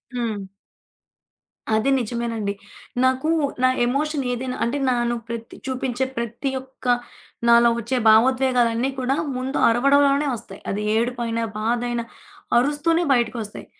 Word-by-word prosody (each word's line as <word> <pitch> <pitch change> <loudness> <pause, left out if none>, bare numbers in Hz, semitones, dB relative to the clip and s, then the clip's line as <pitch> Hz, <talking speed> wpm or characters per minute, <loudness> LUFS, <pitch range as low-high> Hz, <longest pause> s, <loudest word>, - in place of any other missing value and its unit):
హ్మ్. 220 -5 -3 1.3
అది 220 +5 +1
నిజమేనండి. 230 -3 -2 0.5
నాకు 260 +4 +1 0.3
నా 255 - +6 0.2
ఎమోషన్ 285 +3 -1
ఏదైనా, 255 +1 -3
అంటే 235 +5 0
నేను 240 -1 +1
ప్రతి 230 -1 -7
చూపించే 260 0 -1
ప్రతి 235 +4 -3
ఒక్క 265 0 -19 0.6
నాలో 235 0 +6
వచ్చే 235 +3 -2
భావోద్వేగాలన్నీ 250 +1 +3
కూడా, 260 +2 0 0.2
ముందు 260 +2 -3
అరవడంలోనే 280 +4 +3
వస్తాయి. 205 -3 -11
అది 205 +2 -2
ఏడుపైన, 235 0 -1 0.2
బాధైన 240 +2 -1 0.6
అరుస్తూనే 295 +6 +2
బయటకొస్తాయి. 230 -3 -2
245 Hz, 110 wpm, -22 LUFS, 230-265 Hz, 1.3 s, నా